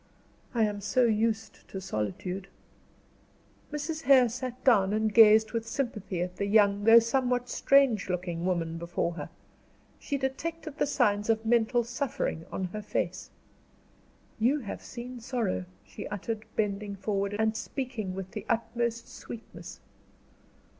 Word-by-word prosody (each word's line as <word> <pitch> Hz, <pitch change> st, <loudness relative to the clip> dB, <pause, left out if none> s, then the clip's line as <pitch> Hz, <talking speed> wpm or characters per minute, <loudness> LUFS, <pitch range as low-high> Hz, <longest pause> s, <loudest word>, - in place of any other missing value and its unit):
"I 230 Hz, -, +3 dB
am 205 Hz, -1 st, -1 dB
so 250 Hz, +5 st, +2 dB
used 220 Hz, 0 st, -1 dB
to 190 Hz, -, -6 dB
solitude." 180 Hz, -, -4 dB, 1.2 s
Mrs. 305 Hz, +2 st, -3 dB
Hare 260 Hz, -5 st, +6 dB
sat 255 Hz, +1 st, -6 dB
down, 205 Hz, -6 st, +4 dB
and 215 Hz, 0 st, +1 dB
gazed 220 Hz, 0 st, +7 dB
with 230 Hz, -1 st, -3 dB
sympathy 215 Hz, -8 st, -2 dB
at 180 Hz, 0 st, -6 dB
the 200 Hz, -, -1 dB
young, 205 Hz, -1 st, +4 dB
though 225 Hz, +1 st, +9 dB
somewhat 245 Hz, +1 st, +2 dB
strange 270 Hz, -8 st, +3 dB
looking 175 Hz, -2 st, -2 dB
woman 165 Hz, -2 st, -1 dB
before 170 Hz, 0 st, -2 dB
her. 155 Hz, -1 st, -6 dB, 0.7 s
She 280 Hz, -, -2 dB
detected 310 Hz, +3 st, -4 dB
the -, -, +2 dB
signs 205 Hz, -6 st, +1 dB
of 225 Hz, 0 st, +1 dB
mental 240 Hz, +1 st, +3 dB
suffering 240 Hz, -, -3 dB
on 190 Hz, -, -3 dB
her 215 Hz, -, -4 dB
face. 185 Hz, -3 st, -3 dB, 1.1 s
"You 265 Hz, +6 st, +2 dB
have 210 Hz, -, -6 dB
seen 245 Hz, +1 st, -8 dB
sorrow," 230 Hz, -, -2 dB, 0.2 s
she 95 Hz, -, -8 dB
uttered, 215 Hz, +2 st, -4 dB
bending 205 Hz, -1 st, -1 dB
forward, 200 Hz, +1 st, -2 dB
and 220 Hz, 0 st, +1 dB
speaking 220 Hz, -5 st, -4 dB
with 190 Hz, 0 st, -6 dB
the 210 Hz, -, -6 dB
utmost 235 Hz, 0 st, -1 dB
sweetness. 230 Hz, -1 st, -10 dB
220 Hz, 140 wpm, -29 LUFS, 195-245 Hz, 1.2 s, though